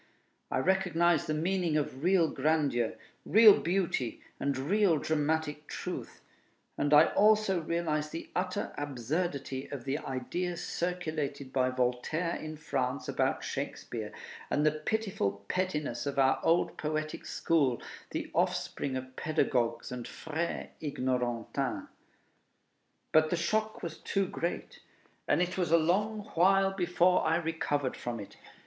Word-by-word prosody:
I - - 0
recognized 175 0 +2
the 155 - 0
meaning 170 0 +1
of 140 -2 -3
real 180 -2 +4
grandeur, 140 -6 +1 0.3
real 215 -1 +8
beauty, 170 -9 -1 0.2
and 140 -1 0
real 180 +5 +3
dramatic 150 0 -1
truth; - - -6 0.5
and 145 - 0
I 150 +2 +7
also 210 -3 +4
realized 155 -2 -1
the 165 - -7
utter 185 +2 -2
absurdity 140 0 -2
of 140 -4 -7
the 140 +2 -1
ideas 170 +7 -3
circulated 155 -6 -3
by 130 -1 +2
Voltaire 130 +7 0
in 155 0 -6
France 140 -3 -2
about - - 0
Shakespeare, - - -4 0.4
and 150 - +1
the 155 - +5
pitiful 155 - -2
pettiness 150 -9 -1
of 140 - -3
our 135 -1 +4
old 170 +2 +2
poetic 155 0 -2
school, 140 -7 +1 0.3
the - - -4
offspring 130 -2 0
of 130 0 -8
pedagogues 130 -8 0
and 125 -1 -5
frères 160 +2 -4
ignorantins. 125 -5 -2 1.2
But 155 0 +5
the 175 - +1
shock 215 +6 -1
was 165 -2 -5
too 195 0 0
great, 175 -1 -4 0.5
and - - +3
it 180 +1 -3
was 175 -3 0
a 170 - +7
long 205 +7 +1
while 195 +3 +4
before 180 -1 +3
I 160 - +2
recovered 160 -5 -1
from 120 -1 -4
it. 100 - -9
155 Hz, 130 wpm, -31 LUFS, 135-175 Hz, 1.2 s, real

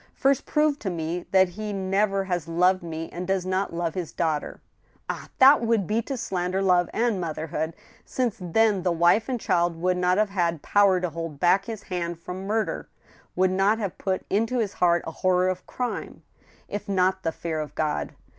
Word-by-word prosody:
First 275 -1 +1
prove 300 -1 +2
to 195 - -3
me 170 0 -4
that 190 -1 +4
he 210 +3 -5
never 195 +1 +1
has 175 -4 -2
loved 180 +3 +3
me 165 -1 -5
and 180 +1 -5
does 190 -1 0
not 185 +1 -1
love 170 -1 -2
his 180 -4 -4
daughter! 160 -3 -2 0.5
Ah! - - -5
that 270 +1 +7
would 230 -4 +1
be 215 +6 0
to 270 +3 -5
slander 185 -3 -2
love 180 -2 +3
and 225 -5 0
motherhood, 160 -1 -3 0.3
since 245 -5 -2
then 200 +3 +2
the 180 0 +1
wife 175 +7 +3
and 250 -2 -1
child 175 -4 +1
would 180 +1 +1
not 180 +1 +2
have 210 -1 +2
had 170 -5 0
power 200 -2 +4
to 180 -2 -2
hold 165 -2 -6
back 190 +4 +3
his 220 -2 -6
hand 175 -2 -3
from 180 +3 -7
murder, 220 +1 -1 0.5
would 185 0 +3
not 195 +3 +3
have 200 -5 -3
put 190 -1 -2
into 225 +5 0
his 215 -5 -1
heart 175 -1 +2
a - - -4
horror 185 +2 +2
of 185 0 -4
crime, 250 -1 -4 0.4
if 205 0 -5
not 190 -1 +2
the 165 - -1
fear 160 -1 -4
of 150 -1 -6
God. 155 -1 -2
185 Hz, 195 wpm, -25 LUFS, 170-205 Hz, 0.5 s, that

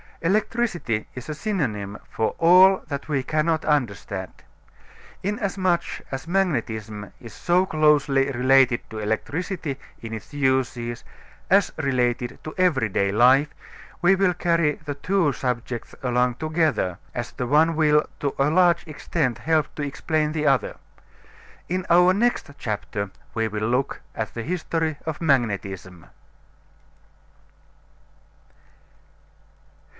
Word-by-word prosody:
Electricity 180 - 0
is 125 +1 -8
a - - -2
synonym 120 - -2
for 110 - -1
all 185 +3 +6
that 140 -2 -5
we 140 -3 0
cannot 155 +3 0
understand. 105 - -1 0.9
Inasmuch 190 -4 0 0.3
as 135 +3 -5
magnetism 115 - -2
is 115 -3 -11
so 180 +2 +2
closely 145 -4 +3
related 130 -1 +4
to 110 - -5
electricity 145 - -3 0.2
in 115 -1 -7
its 110 +4 -8
uses 130 -4 0 0.5
as 195 0 +4
related 125 -4 0
to 155 - -7
every 150 -12 +2
day 100 0 +1
life, 130 +7 +5 0.5
we 180 +2 +5
will 190 -1 +2
carry 170 -3 +2
the 145 - -3
two 165 +1 +1
subjects 120 -2 -4
along 125 -1 +1
together, 155 - 0 0.2
as 120 -1 -4
the 125 - -4
one 160 +5 +4
will 150 -1 +4 0.2
to 140 -2 -1
a 140 +1 +3
large 175 +1 +3
extent 150 -4 -2
help 160 -1 +1
to - - -5
explain 150 +2 -1
the 155 -1 -2
other. 135 -5 +2 0.9
In 185 +1 -2
our 180 +2 +6
next 235 -4 0
chapter 105 -2 -3 0.2
we 115 -1 0
will 110 0 -2
look 125 +3 -1
at 110 -1 -5
the 115 - -4
history 160 -1 -2
of 160 -2 -4
magnetism. 100 - -1
145 Hz, 120 wpm, -24 LUFS, 120-170 Hz, 0.9 s, all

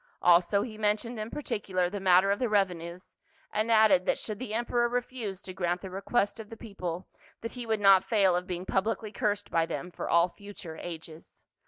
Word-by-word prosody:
Also 180 +3 +5
he 215 -3 -8
men 210 0 +3
tioned 235 +1 -7
in 215 +1 -4
particular 190 -10 -2
the 200 +3 -5
matter 190 +1 +5
of 200 - 0
the 245 - 0
revenues, 180 -3 -1 0.4
and 215 +2 0
added 215 -5 +5
that - - +2
should 215 -2 -5
the 255 -4 -5
emperor 240 +1 +1
refuse 240 -5 -4
to 185 - -7
grant 175 -1 -1
the 190 - -7
re 190 +1 -5
quest 215 0 0
of 215 -1 -8
the 225 - -9
people 185 -6 -6 0.3
that 230 - -5
he 245 -2 -7
would 220 -1 +1
not 195 -2 +6
fail 195 -5 +3
of 180 +1 -2
being 180 -1 -4
publicly 210 +2 -1
cursed 205 0 -1
by 165 -1 +3
them 180 - -5
for - - -5
all 170 +1 +5
future 190 -3 -10
ages. 160 -1 -9
200 Hz, 210 wpm, -29 LUFS, 180-220 Hz, 0.4 s, not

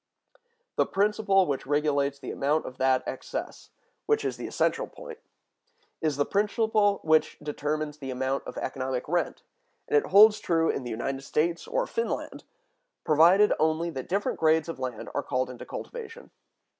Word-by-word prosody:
The - - +3
principle 200 -1 +2
which 140 -5 -3
regulates 145 -1 +1
the - - -7
amount 150 +3 0
of 130 - -9
that 130 0 +3
excess—which 440 -1 -5
is - - -1
the - - -6
essential - - 0
point—is 465 - -8
the 145 - +2
principle 210 0 +1
which 155 0 +2
determines 150 0 -3
the 135 -2 -6
amount 130 +1 -2
of - - -7
economic 130 -1 -3
rent, 175 +3 -1 0.4
and 450 - 0
it 440 - +3
holds 210 +1 +7
true 165 -5 +1
in 135 - -4
the 120 - -6
United 135 +4 -3
States 165 +5 -1
or - - 0
Finland, 465 -2 -3 0.6
provided 170 +7 +5
only 160 +2 +1
that 130 -4 -7
different 200 +3 -1
grades 160 0 +3
of 165 - -6
land 125 -4 -5
are - - 0
called 130 -1 -2
into 125 - -10
cultivation. 470 0 -8
160 Hz, 155 wpm, -27 LUFS, 140-210 Hz, 0.6 s, holds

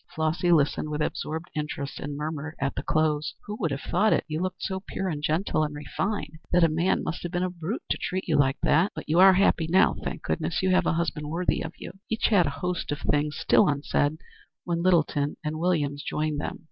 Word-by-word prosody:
Flossy 160 +3 +1
listened 150 -1 +2
with 150 0 -1
absorbed 160 +3 -4
interest 150 -2 -4
and 145 0 -5
murmured 155 +1 -4
at 140 0 -1
the - - -3
close: 155 -1 0
"Who 210 - -5
would 165 - 0
have 135 -1 -3
thought 205 +5 +2
it? - - +1
You 155 +1 -3
look 185 0 -2
so 190 0 -3
pure 190 0 -4
and 150 -5 -3
gentle 155 +1 +1
and 150 -1 -3
refined 155 +2 -3
that 180 -1 +4
a 165 - +5
man 170 +5 +1
must 165 - -4
have 175 - -5
been 175 0 0
a 185 - -1
brute 175 +6 -4
to - - 0
treat 185 +1 -3
you 160 - +2
like 135 -2 +3
that. 165 +7 +3
But - - -7
you 160 +3 +3
are 190 0 +9
happy 180 -4 +3
now, 185 +3 +5
thank - - -5
goodness. 120 - -1
You 190 - +3
have 185 -1 +3
a - - +2
husband 150 -3 -2
worthy 175 +3 0
of 160 - -5
you." 195 - -10
Each 225 - +1
had 190 -7 +4
a 140 +1 -5
host 180 -4 -2
of 145 0 -3
things 150 0 0
still - - +4
unsaid 145 +1 0 0.5
when 170 -1 -1
Littleton 155 -5 +2
and 155 0 -3
Williams 150 -5 0
joined 150 -1 -2
them. - - -4
160 Hz, 230 wpm, -26 LUFS, 150-180 Hz, 0.5 s, are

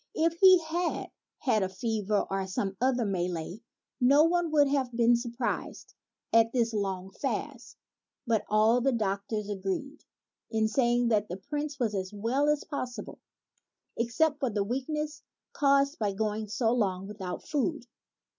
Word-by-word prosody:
If 330 +1 +1
he 375 -1 +9
had 335 +2 -2 0.3
had 230 -6 +1
a 190 - 0
fever, 210 +1 -1
or 195 0 -2
some 195 +1 -2
other 255 -2 +2
malady, 180 0 -3 0.4
no 275 +4 +6
one 345 0 +2
would 295 -2 +4
have 270 -3 0
been 235 0 +4
surprised 235 +1 -4 0.4
at 225 0 +5
this 235 -2 +1
long 195 -2 -2
fast; 260 +2 -4 0.5
but 230 -3 +1
all 220 +3 +4
the 270 +2 +2
doc 200 -3 -1
tors 210 -2 -2
agreed 205 +9 -4 0.5
in 220 -1 +1
saying 240 0 +2
that 210 -2 +2
the 180 - -4
Prince 290 +5 -4
was 230 -4 0
as 190 -2 -3
well 235 +8 0
as 300 -1 +1
possible 245 -7 -6 0.8
except 285 +6 +1
for 265 -3 0
the 205 -2 0
weakness 300 +7 -3 0.3
caused 280 +1 +2
by 205 -3 0
going 215 +1 -2
so 225 +2 0
long 195 -6 0
without 195 -3 -6
food. 300 -2 -1
235 Hz, 155 wpm, -29 LUFS, 205-280 Hz, 0.8 s, he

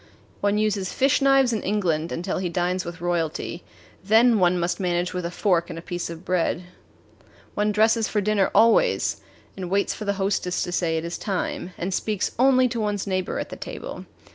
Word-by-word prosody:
One 205 +1 +1
uses 210 -3 0
fish 270 +2 +2
knives 270 -3 +4
in 220 - -1
England 170 -5 0
until 180 +3 -2
he 185 -2 -2
dines 180 +1 -1
with 170 -1 -7
royalty 170 0 -2 0.4
then 225 +3 +5
one 180 -1 +3
must 175 0 -1
manage 180 -1 -1
with 180 -1 -2
a - - -5
fork 175 -2 +1
and 165 - -6
a - - -6
piece 175 -1 -4
of 165 +1 -9
bread. 180 -1 0 0.9
One 210 +1 +1
dresses 220 +1 +3
for 210 - 0
dinner 205 -1 +2
always, 230 - +3 0.3
and 185 -2 -5
waits 200 +2 +1
for 215 - -7
the 200 - +1
hostess 195 -2 -1
to 175 - -4
say 165 -2 0
it 160 - -3
is 170 - -5
time, 185 -2 -3
and 185 +2 -3
speaks 210 +1 -1
only 255 0 +5
to 235 -1 -3
one's 205 -2 -1
neighbor 185 -2 -2
at - - -6
table. - - -7
190 Hz, 190 wpm, -24 LUFS, 175-215 Hz, 0.9 s, then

